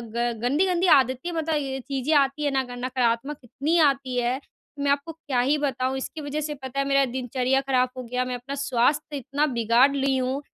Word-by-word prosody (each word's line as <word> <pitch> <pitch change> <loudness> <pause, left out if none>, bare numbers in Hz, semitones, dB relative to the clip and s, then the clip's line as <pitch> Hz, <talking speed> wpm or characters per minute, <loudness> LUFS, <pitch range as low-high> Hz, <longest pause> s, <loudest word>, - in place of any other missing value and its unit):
ग 240 0 +1
गंदी-गंदी 350 +8 +2
आदतें 260 +5 +1
मतलब 320 -1 -1
ये 270 -2 -3
चीज़ें 275 +2 -1
आती 275 +1 +1
है 285 - +1
ना 265 -1 +1
ग 245 0 -7
नकारात्मक 255 +2 0
इतनी 295 +8 -1
आती 270 -2 -3
है 245 +2 0
कि 285 0 -16
मैं 285 - +2
आपको 285 +3 -1
क्या 295 -5 -3
ही 275 +5 +2
बताऊँ। 265 -2 -1
इसकी 305 +4 -6
वजह 290 +1 -3
से 300 0 -3
पता 260 +1 -4
है 275 - +1
मेरा 275 0 +3
दिनचर्या 255 +1 0
ख़राब 255 -2 +1
हो 255 - -5
गया 250 +2 -2
मैं 250 0 -3
अपना 260 +3 -6
स्वास्थ्य 280 +4 +1
इतना 275 +3 -1
बिगाड़ 235 +5 +4
ली 270 -1 +1
हूँ 260 +2 -1
270 Hz, 210 wpm, -25 LUFS, 255-290 Hz, -, बिगाड़